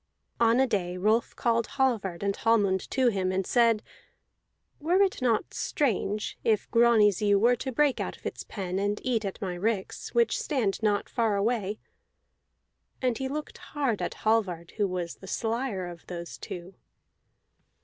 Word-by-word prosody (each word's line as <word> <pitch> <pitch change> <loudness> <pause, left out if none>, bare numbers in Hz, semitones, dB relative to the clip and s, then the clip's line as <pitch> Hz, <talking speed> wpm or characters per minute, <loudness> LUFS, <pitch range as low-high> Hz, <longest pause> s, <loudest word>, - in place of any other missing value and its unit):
On 230 +1 +4
a 265 - +5
day 185 -7 -1
Rolf 215 +5 +1
called 230 -1 +1
Hallvard 215 -10 0
and 200 0 0
Hallmund 205 -5 +2
to 260 -2 +3
him, 190 -4 0
and 190 0 -1
said: 230 -1 +3 1.0
"It - - -22
were 370 +5 +4
not 235 -3 +1
strange 215 - -1
if 215 -3 +1
Grani's 230 -5 +5
ewe 205 -1 +4
were 235 +4 +4
to 265 - -4
break 285 +2 +2
out - - -3
of - - -26
its - - -4
pen 190 -2 -4
and 205 +1 0
eat 240 -4 0
at 195 - -4
my 185 -2 -2
ricks, 195 +2 -2
which 475 +1 +3
stand 255 - -1
not 205 -2 +1
far 225 -3 +1
away." 210 0 0 1.2
And 250 -3 0
he 265 - -1
looked 300 +3 -5
hard 275 -8 -2
at - - -3
Hallvard, 185 -7 +1
who 205 -2 +2
was 180 -2 -4
the 190 - -12
slyer 225 -2 -2
of 175 -2 -10
those 170 -8 -7
two. 180 +7 -7
215 Hz, 165 wpm, -28 LUFS, 190-240 Hz, 1.2 s, a